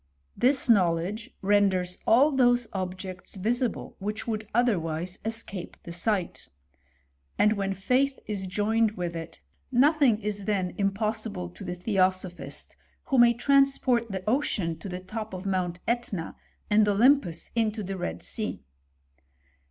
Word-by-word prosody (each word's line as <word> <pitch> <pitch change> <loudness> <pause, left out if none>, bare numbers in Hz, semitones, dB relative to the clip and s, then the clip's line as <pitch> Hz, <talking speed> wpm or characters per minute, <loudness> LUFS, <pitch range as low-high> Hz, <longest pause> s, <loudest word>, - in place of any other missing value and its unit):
" 65 - -43
This 270 +1 +4
knowledge 195 +2 +2
renders 190 -3 +2
all 265 +7 +6
those 245 -3 +3
objects 185 0 -5
visible 230 +5 -2
which 210 +3 -4
would 215 -2 -3
otherwise 180 -7 0
escape 220 -5 -5
the 170 - -8
sight; 185 0 -2 0.9
and 210 - +4
when 195 -2 -2
faith 260 +8 +1
is 200 -3 -4
joined 215 +3 +1
with 175 -1 -3
it, 165 -1 -8 0.3
nothing 270 -3 +4
is 205 -2 -4
then 190 -4 0
impossible 200 - -1
to 90 - -11
the 180 - -4
theosophist, 185 -1 -1 0.3
who 265 - +3
may 235 0 +6
transport 260 -2 +3
the 190 -1 -5
ocean 215 - 0
to 195 - -7
the 180 0 -4
top 215 +1 -6
of 185 +2 -7
Mount 180 -2 -1
^tna, 230 -8 -2 0.3
and 210 0 +4
Olympus 205 - +3
into 220 -2 0
the 195 +1 -4
Red 85 - -4
Sea." - - -3
205 Hz, 135 wpm, -27 LUFS, 185-235 Hz, 0.9 s, all